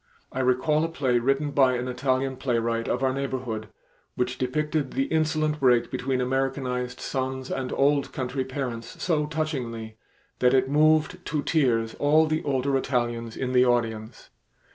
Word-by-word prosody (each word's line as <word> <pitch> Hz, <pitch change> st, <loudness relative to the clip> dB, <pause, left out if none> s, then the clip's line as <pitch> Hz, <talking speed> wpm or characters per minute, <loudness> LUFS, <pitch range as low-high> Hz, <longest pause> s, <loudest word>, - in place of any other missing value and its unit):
I 130 Hz, -, -4 dB
recall 130 Hz, +5 st, +2 dB
a -, -, +1 dB
play 130 Hz, -7 st, +1 dB
written 135 Hz, +4 st, 0 dB
by 130 Hz, -3 st, +4 dB
an 125 Hz, +1 st, -3 dB
Italian 130 Hz, +1 st, -1 dB
playwright 115 Hz, -3 st, -1 dB
of 125 Hz, -, -1 dB
our 130 Hz, -1 st, +2 dB
neighborhood, 130 Hz, -5 st, -3 dB, 0.5 s
which 125 Hz, 0 st, -2 dB
depicted 150 Hz, +2 st, -1 dB
the 270 Hz, -, +1 dB
insolent 155 Hz, -, 0 dB
break 125 Hz, -3 st, +3 dB
between 130 Hz, 0 st, -1 dB
Americanized 125 Hz, -1 st, -1 dB
sons 130 Hz, -1 st, -3 dB
and 130 Hz, -1 st, -3 dB
old 140 Hz, 0 st, +2 dB
country 130 Hz, +1 st, -2 dB
parents, 130 Hz, -4 st, -5 dB
so 150 Hz, -4 st, +1 dB
touchingly 125 Hz, -8 st, -4 dB, 0.4 s
that 125 Hz, +1 st, +4 dB
it 130 Hz, 0 st, +3 dB
moved 155 Hz, +5 st, +3 dB
to 150 Hz, -1 st, -2 dB
tears 120 Hz, -8 st, +1 dB
all 155 Hz, +2 st, +4 dB
the 155 Hz, +1 st, -1 dB
older 135 Hz, -1 st, 0 dB
Italians 120 Hz, -3 st, -1 dB
in 130 Hz, -1 st, -2 dB
the 125 Hz, 0 st, +5 dB
audience. 115 Hz, -2 st, -2 dB
130 Hz, 155 wpm, -26 LUFS, 125-145 Hz, 0.5 s, the